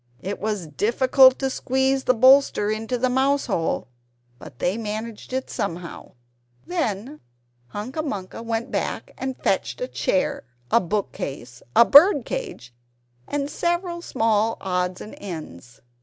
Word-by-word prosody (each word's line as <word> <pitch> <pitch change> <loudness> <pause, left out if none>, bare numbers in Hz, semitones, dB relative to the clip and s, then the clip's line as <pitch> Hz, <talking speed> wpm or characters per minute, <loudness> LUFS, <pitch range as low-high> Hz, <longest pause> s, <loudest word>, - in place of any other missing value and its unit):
It 200 +2 -4
was 210 -4 -2
difficult 255 - +4
to 270 -1 -1
squeeze 265 +1 0
the 255 - +3
bolster 260 -4 +5
into 225 +3 -2
the 255 +2 +1
mouse 270 +3 +2
hole; 170 - -1 0.5
but - - -12
they 180 +9 0
managed 220 +1 -5
it 260 0 -2
somehow. 175 -3 -5 0.5
Then 280 - -3 0.5
Hunca 230 - -5
Munca 205 -9 -5
went 230 +1 -3
back - - -3
and 265 -1 -4
fetched - - -1
a - - -2
chair, 185 - -1 0.3
a 230 - +6
book 200 +3 -2
case, 125 -2 -7
a 235 - +8
bird 320 - +7
cage, 430 - -6 0.5
and 285 -1 -2
several 345 +3 -2
small 225 -6 +1
odds 180 -1 -2
and 215 - -9
ends. 150 - -9
230 Hz, 140 wpm, -23 LUFS, 195-270 Hz, 0.5 s, a